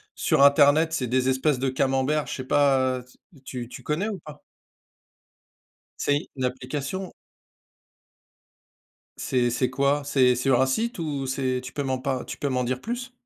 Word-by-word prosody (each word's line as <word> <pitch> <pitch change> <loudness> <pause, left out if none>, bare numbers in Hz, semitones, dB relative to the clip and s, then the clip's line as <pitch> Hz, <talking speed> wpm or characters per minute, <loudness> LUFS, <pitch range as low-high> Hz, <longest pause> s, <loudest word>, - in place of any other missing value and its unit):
sur 140 - +2
internet. 145 +3 +5
C'est 130 -5 -1
des 130 +2 +1
espèces 130 +1 +1
de 135 - 0
camemberts, 135 +3 0
je - - -4
sais 130 - -5
pas, 130 -2 +2
heu, 125 - -13 0.4
tu 125 -2 -6
tu - - -9
connais 175 +9 -1
ou 200 - -5
pas? 150 -2 -12 1.6
C'est 145 0 0
une 130 - -3
application? 140 +8 -4 2.0
C'est 125 -2 0
c'est 125 +1 0
quoi, 140 +2 +1
c'est 130 -3 +3
c'est 125 - -3
sur 135 -2 +3
un 130 - +4
site 225 - -1
ou 145 -5 -3
c'est 130 -1 -1
tu 130 - -8
peux 145 - -2
m'en 130 -1 -1
par 130 0 -2
tu - - -6
peux 145 - -1
m'en 130 -1 0
dire 125 +1 -2
plus? 245 - -5
135 Hz, 170 wpm, -25 LUFS, 130-145 Hz, 2.0 s, internet